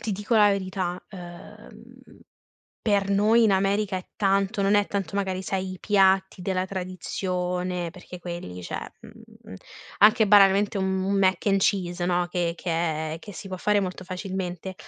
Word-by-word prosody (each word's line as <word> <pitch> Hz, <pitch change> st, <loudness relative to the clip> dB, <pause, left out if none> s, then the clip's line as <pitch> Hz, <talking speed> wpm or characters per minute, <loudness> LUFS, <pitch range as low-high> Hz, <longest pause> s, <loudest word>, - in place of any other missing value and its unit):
ti 215 Hz, -, -3 dB
dico 210 Hz, +4 st, -2 dB
la 210 Hz, -1 st, +6 dB
verità: 185 Hz, -2 st, -2 dB
uhm, 175 Hz, -3 st, -12 dB, 0.8 s
per 200 Hz, -2 st, +1 dB
noi 215 Hz, +4 st, +4 dB
in 215 Hz, -, +4 dB
America 195 Hz, +1 st, +1 dB
è 185 Hz, -, -5 dB
tanto 195 Hz, +1 st, +1 dB
non 200 Hz, +1 st, +3 dB
è 205 Hz, -1 st, +3 dB
tanto, 200 Hz, -2 st, -3 dB
magari, 190 Hz, -2 st, -1 dB
sai, 190 Hz, 0 st, -3 dB
i 185 Hz, -, -9 dB
piatti 190 Hz, -2 st, +2 dB
della 185 Hz, 0 st, -1 dB
tradizione 180 Hz, -1 st, -3 dB
perché 180 Hz, 0 st, -11 dB
quelli, 170 Hz, -, -7 dB
cioè, -, -, -6 dB
mhmm, -, -, -14 dB, 0.5 s
anche 215 Hz, +1 st, +6 dB
banalmente 200 Hz, 0 st, +5 dB
un 190 Hz, -1 st, 0 dB
un 195 Hz, +1 st, 0 dB
Mac 190 Hz, 0 st, +2 dB
and 195 Hz, -1 st, +3 dB
Cheese, 180 Hz, -3 st, 0 dB
no, 175 Hz, 0 st, +1 dB
che 175 Hz, -2 st, -1 dB
che 175 Hz, 0 st, -5 dB, 0.4 s
è -, -, -5 dB
che 205 Hz, -, -10 dB
si 195 Hz, +3 st, -9 dB
può 185 Hz, -, -5 dB
fare 205 Hz, +2 st, +2 dB
molto 185 Hz, -1 st, -5 dB
facilmente, 185 Hz, -1 st, -5 dB
190 Hz, 165 wpm, -25 LUFS, 180-200 Hz, 0.8 s, la